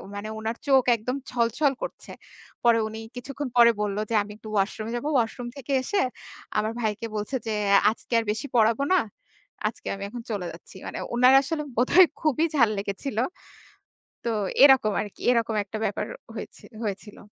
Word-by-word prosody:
মানে 205 +1 -5
উনার 225 +2 -3
চোখ 265 -2 +5
একদম 240 +4 -3 0.2
ছল-ছল 245 +4 +1
করছে। - - -7 0.5
পরে 235 -1 +5
উনি 220 +1 -7 0.2
কিছুক্ষণ 275 +3 -5
পরে 235 0 +8
বললো 205 0 -1
যে - - -2
আমি 205 - -10
একটু 215 - -10
ওয়াশরুমে 215 +3 -1
যাবো। 240 +5 -3
ওয়াশরুম 240 0 0
থেকে 275 +1 -7
এসে 410 - 0 0.6
আমার 215 +1 0
ভাইকে 215 +1 -2
বলছে 210 +6 -3
যে 220 - 0 0.4
আজকে 230 - -9
আর - - -1
বেশি 220 +7 -4
পড়াবো 230 +3 +4
না। 370 - +5 0.7
আজকে 215 - -7
আমি 195 - -7
এখন 240 +1 -7
চলে 195 -4 -2
যাচ্ছি। 165 - -14
মানে - - -5 0.2
উনার 250 +2 +6
আসলে 300 +2 -3
বোধহয় 340 +9 +6
খুবই 310 +1 +2
ঝাল 235 -6 +5
লেগেছিলো। 205 +4 -2 1.0
তো 235 - +1 0.3
এরকম 265 -6 +7
আরকি, 205 - -9
এরকম 230 -2 +1
একটা 205 +2 -6
ব্যাপার 205 - -2 0.3
হয়েছি - - -8 0.2
হয়েছিলো। 205 0 -6
230 Hz, 165 wpm, -26 LUFS, 215-260 Hz, 1.0 s, পরে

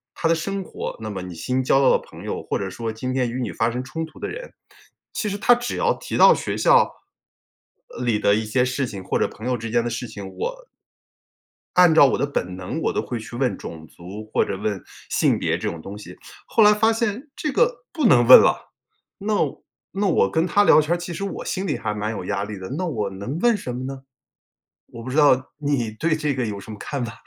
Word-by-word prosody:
他 165 - 0
的 165 - +4
生 195 +4 -3
活， - - -6
那 110 -1 -5
么 95 - -5
你 90 -2 -8
新 130 +8 -1
交 135 - +3
到 135 - +5
的 - - +3
朋 - - -13
友， - - -4
或 - - -2
者 95 -1 -4
说 115 +2 -4
今 130 +4 -4
天 125 -2 0
与 125 +2 -4
你 110 -7 -3
发 115 +7 0
生 125 +2 -4
冲 160 +5 -4
突 155 - -16
的 - - -3
人。 - - -8 0.6
其 215 - -2
实 200 - -3
他 245 - +5
只 245 0 -2
要 475 0 +2
提 - - -5
到 485 - +8
学 - - -3
校， - - +5 1.0
呃， - - -7
里 115 -3 +2
的 100 - +3
一 110 +1 +1
些 125 +4 +1
事 130 +1 -1
情 95 -4 -7
或 - - -1
者 - - +2
朋 110 - -11
友 125 0 +1
之 115 0 -6
间 120 0 +1
的 120 - -2
事 120 +1 -4
情， 100 -3 -8
我 - - -5 1.1
按 180 -3 +7
照 150 - +8
我 - - +2
的 - - +1
本 90 -10 -3
能 95 - -4
我 - - +1
都 - - 0
会 120 -2 -5
去 110 +2 -9
问 125 0 0
种 80 -1 -9
族 105 +5 -10
或 - - +3
者 95 - -4
问 105 -2 -3 0.3
性 - - +2
别 80 0 0
这 105 +3 -2
种 85 -3 -7
东 100 +4 -8
西， 105 - -11 0.3
后 225 - +3
来 210 0 +7
发 220 +2 +3
现， 235 +5 -2
这 300 - -2
个 - - +1
不 310 -6 0
能 120 - +6
问 130 - +12
了。 - - 0 0.5
那 210 +2 -2 0.6
那 200 +1 0
我 100 - +3
跟 160 - +1
他 205 +2 +4
聊 155 - +7
天 155 +3 0
儿 - - +1
其 175 0 -6
实 195 - -5
我 200 - -5
心 190 +1 -2
里 - - -1
还 105 -3 -3
蛮 105 +1 -3
有 95 -4 -5
压 100 0 -2
力 105 -1 -6
的， 95 - -7
那 185 - -1
我 110 - -2
能 100 +11 -5
问 240 0 +4
什 125 -11 -5
么 130 +1 -5
呢？ 135 0 -6 0.9
我 115 -1 -10
不 130 - -6
知 130 - -4
道 130 -3 +4
你 140 -7 -1
对 155 +8 0
这 150 -2 -1
个 125 -2 -1
有 100 -2 -4
什 110 - -10
么 105 - -8
看 140 +2 -4
法。 115 - -7
130 Hz, 270 characters per minute, -23 LUFS, 110-175 Hz, 1.1 s, 问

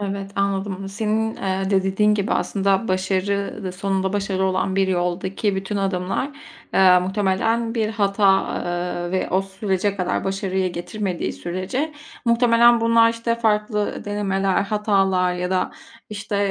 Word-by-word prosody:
Evet, 195 -1 -4
anladım. 195 -1 -1
Senin, 220 +2 -1
eee, 190 0 -2
de 190 -1 +3
dediğin 210 +2 +2
gibi 205 +1 -1
aslında 195 +1 0
başarı 190 +2 -1
da 185 - -3
sonunda 190 0 -1
başarı 195 -2 -1
olan 190 0 0
bir 195 -1 +2
yoldaki 185 +3 -1
bütün 195 +2 -3
adımlar, 195 +7 -1 0.4
eee, 185 -1 +6
muhtemelen 205 +5 0
bir 220 -2 0
hata, 200 -2 +2
eee, 175 0 -3
ve 185 - -1
o 190 +1 +2
sürece 195 0 -2
kadar 180 -1 -1
başarıyı 190 -1 -1
getirmediği 185 +1 -3
sürece 185 - -3 0.3
muhtemelen 235 0 +5
bunlar 230 0 +5
işte 230 0 -1
farklı 210 -2 0
ı - - -9
denemeler, 195 -2 0
hatalar 195 -3 +1
ya 180 0 -3
da, 185 -1 0 0.4
işte, 205 0 -4
195 Hz, 140 wpm, -22 LUFS, 190-210 Hz, 0.4 s, eee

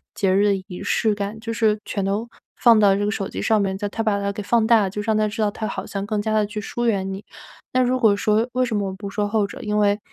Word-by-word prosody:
节 190 -2 +1
日 200 +1 +4
的 205 -1 +3
仪 180 -3 -8
式 220 -2 +1
感， 205 +1 -4
就 230 +1 -5
是 220 -2 +2
全 200 - -3
都 200 +4 -1 0.3
放 230 -3 +5
到 200 -2 +5
这 205 +1 -1
个 210 - 0
手 195 -3 -3
机 - - -6
上 220 -2 +2
面， 190 -1 -1
在 205 - -3
它 215 +3 -4
把 215 -2 +1
它 200 0 -1
给 205 - -6
放 225 +2 +2
大 225 0 +5
了， 195 - 0
就 205 - -6
让 220 0 +1
他 215 0 +2
知 215 +2 -4
道 205 - +1
他 215 +1 -4
好 - - -5
像 195 -1 -4
更 215 -1 -1
加 215 +1 -1
地 215 -1 +3
去 210 +1 -5
疏 240 +3 -3
远 195 -4 0
你。 195 +2 -7 0.5
那 255 - +3
如 255 +1 +1
果 220 -5 +4
说 215 +3 +1
为 255 0 +2
什 230 -3 -2
么 200 -1 0
我 - - -6
不 200 +1 -7
说 205 +1 -1
后 210 0 +1
者， 200 - -9
因 210 0 -1
为， 205 0 +2
210 Hz, 325 characters per minute, -22 LUFS, 200-220 Hz, 0.5 s, 放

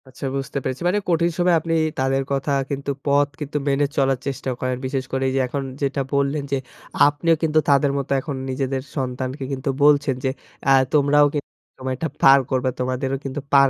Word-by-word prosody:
আচ্ছা 130 +2 -8
বুঝতে 135 +1 -3
পেরেছি। 130 - -3
মানে 195 +4 +2
কঠিন 170 0 +2
সময়ে 175 -1 +3
আপনি 165 +1 -3 0.3
তাদের 135 +1 +1
কথা 140 +1 0 0.2
কিন্তু 140 0 -2
পথ 145 0 +3
কিন্তু 150 0 -3
মেনে 140 +1 +2
চলার 135 -2 +2
চেষ্টা 135 -1 -3
করেন। 130 0 -1
বিশেষ 130 0 -1
করে 135 0 -1
এই - - -3
যে - - +2
এখন 140 +2 -3 0.2
যেটা 140 0 0
বললেন 140 +1 +1
যে 140 - +2 0.5
আপনিও 165 +3 +2
কিন্তু 155 -1 +3
তাদের 140 0 +4
মতো 140 -1 -4
এখন 140 0 -5
নিজেদের 130 0 -2
সন্তানকে 130 0 -3
কিন্তু 135 +1 -3
বলছেন 145 -2 +4
যে, - - +3 0.4
আ - - +6 0.2
তোমরাও 145 0 +5
কিন্তু 145 -2 -3 0.5
এটা 165 - -2 0.2
পার 135 +1 +8
করবে 130 0 +1
তোমাদেরও 130 +1 -1
কিন্তু 135 +2 -3
পার 140 -1 +7
140 Hz, 190 wpm, -22 LUFS, 135-145 Hz, 0.5 s, পার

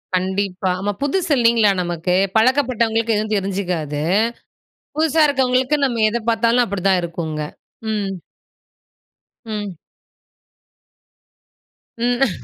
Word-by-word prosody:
கண்டிப்பா. 190 0 -1
ஆமா. 205 +2 -1
புதுசு 335 +4 0
இல்லைங்களா 230 -3 +4
நமக்கு. 175 0 -1 0.2
பழக்கப்பட்டவங்களுக்கு 230 -2 +2
எதுவும் 215 +1 -2
தெரிஞ்சுக்காது. 180 -7 -2 1.0
புதுசா 315 0 +3
இருக்கவங்களுக்கு 260 0 +2
நம்ம 235 -4 0
எத 230 - -1
பார்த்தாலும் 230 +2 +3
அப்டிதான் 195 -2 +1
இருக்குங்க. 165 -2 -4 0.5
ம். 205 -2 -1 1.3
ம். 210 -4 -5 2.2
ம்.. 240 - 0
215 Hz, 85 wpm, -20 LUFS, 185-245 Hz, 2.2 s, இல்லைங்களா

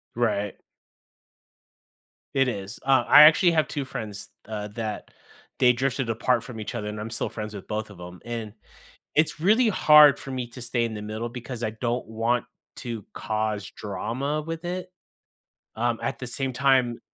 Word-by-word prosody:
Right. 105 -4 -1 1.8
It 135 -1 +3
is, 100 -2 -5
uh, 135 -1 +4
I 150 - +10
actually 155 +3 +7
have 155 -2 +2
2 140 -2 -3
friends, 105 -5 -6 0.2
uh, 105 -1 -4
that 110 0 -5 0.5
they 125 -1 +5
drifted 130 0 -1
apart 115 +1 +1
from 115 -2 -8
each 110 +3 -5
other 105 -2 -3
and 105 0 -5
I'm 110 +2 -5
still 115 - -1
friends 110 -1 -6
with 100 - -9
both 105 0 -3
of 100 -4 -13
'em, 90 0 -10
and 115 -3 -5 0.6
it's 155 0 +2
really 220 +8 +4
hard 150 -7 +7
for 135 - -8
me 130 -2 -3
to 125 +1 -11
stay 120 0 0
in 115 - -4
the 105 - -6
middle 110 +3 -4
because 120 0 -7
I 110 - -1
don't 120 +2 -3
want 115 +2 0 0.3
to 115 -4 -6
cause 110 -2 -2
drama 130 +9 -3
with 165 +2 -6
it? 180 +1 -4 0.9
Um, 115 +1 0
at - - -2
the 125 - -5
same 135 +2 -2
time 130 -2 +2
120 Hz, 175 wpm, -25 LUFS, 110-135 Hz, 1.8 s, I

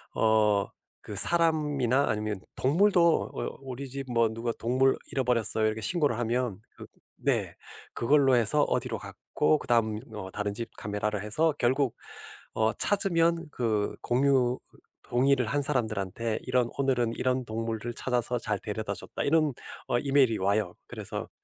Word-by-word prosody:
어 105 -2 +3 0.4
그 105 - -7
사람이나 150 - +3
아니면 105 -2 -2
동물도 170 +3 +3
어 - - -5
우리 135 +1 -6
집 135 +1 -5
뭐 115 -1 +3
누가 115 +1 -3
"동물 130 +3 +2
잃어버렸어요." 120 -4 +2
이렇게 110 0 -2
신고를 145 - +1
하면 120 -3 -1 0.2
그 - - -10 0.3
네. - - 0 0.4
그걸로 135 +1 +3
해서 120 +6 +3
어디로 - - -1
갔고 155 - -1
그다음 110 -4 +1
뭐 105 -4 -8
다른 105 0 -3
집 115 +3 -5
카메라를 105 0 -3
해서 155 +10 +1
결국 130 +1 +1 0.6
어 110 0 +1
찾으면 170 -4 +2
그 110 -5 -1
공유 130 -1 +2 0.2
으 - - -19 0.3
동의를 130 0 +2
한 145 +5 0
사람들한테 110 -4 -1
이런 125 -2 +1
"오늘은 125 -4 +1
이런 130 0 -1
동물을 115 +1 -4
찾아서 125 -1 -1
잘 105 -3 -2
데려다줬다." 105 0 -4
이런 155 -1 +2 0.3
어 120 - +1
이메일이 135 -5 +3
와요. 100 -1 0
그래서 - - -6
120 Hz, 310 characters per minute, -28 LUFS, 110-140 Hz, 0.6 s, 어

